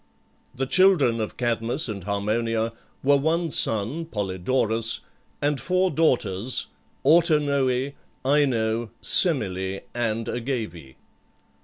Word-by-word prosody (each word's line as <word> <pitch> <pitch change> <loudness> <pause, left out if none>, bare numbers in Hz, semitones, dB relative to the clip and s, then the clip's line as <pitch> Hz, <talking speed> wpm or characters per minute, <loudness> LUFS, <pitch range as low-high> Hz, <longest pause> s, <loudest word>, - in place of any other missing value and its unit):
The 135 +1 -2
children 160 -8 +3
of 110 - -5
Cadmus 120 +3 -1
and 100 -5 -6
Harmonia 110 +3 -1 0.3
were 140 +1 +4
one 160 +3 0
son, 115 +11 0
Polydorus, 110 - 0 0.4
and 145 -1 0
four 185 +1 +1
daughters, 120 - +1 0.4
Autonoe, 140 -4 +2 0.3
Ino, 120 -5 +1
Semele, 95 - +3
and 115 -2 -2
Agave. 110 - -5
120 Hz, 95 wpm, -24 LUFS, 110-145 Hz, 0.4 s, were